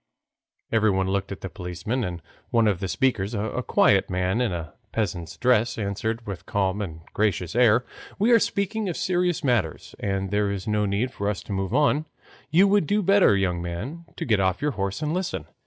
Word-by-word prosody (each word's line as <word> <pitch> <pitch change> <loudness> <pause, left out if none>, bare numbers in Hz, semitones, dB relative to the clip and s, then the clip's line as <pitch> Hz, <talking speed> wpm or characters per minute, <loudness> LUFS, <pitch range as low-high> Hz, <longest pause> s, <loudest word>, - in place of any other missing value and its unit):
Everyone 100 -4 +2
looked 100 0 -1
at 100 - -6
the - - -4
policeman, 90 +7 -3
and 85 -4 -5 0.3
one 115 -2 +3
of 100 -4 +1
the 95 - -2
speakers, 115 -2 0
a 110 +4 -2
quiet 100 -5 +3
man 95 +4 0
in 120 - +1
a 85 -3 -5 0.2
peasant's 90 -7 -3
dress, 120 -2 +2
answered 110 +2 -2
with 100 -3 -5
a - - -33
calm 100 0 0
and 80 -5 -6
gracious 100 -4 0
air, 120 0 +4 0.3
"We 215 +5 +3
are 230 - +7
speaking 200 0 -1
of 170 - -3
serious 180 -2 0
matters, 115 - 0
and 95 -1 -2
there 105 0 +1
is 100 0 -5
no 105 -1 +1
need 105 +6 0
for 100 -3 -2
us 105 - -3
to - - -9
move 95 -1 -1
on; 150 +1 +2 0.4
you 180 +6 +5
would 200 -5 +3
do 205 +1 +1
better, 195 - +5
young 90 -3 0
man, 120 - -5
to - - -3
get 110 -5 +2
off 95 -1 +1
your 150 0 0
horse 100 +3 -3
and 150 +1 -1
listen. 170 - -2
105 Hz, 205 wpm, -25 LUFS, 95-130 Hz, 0.4 s, are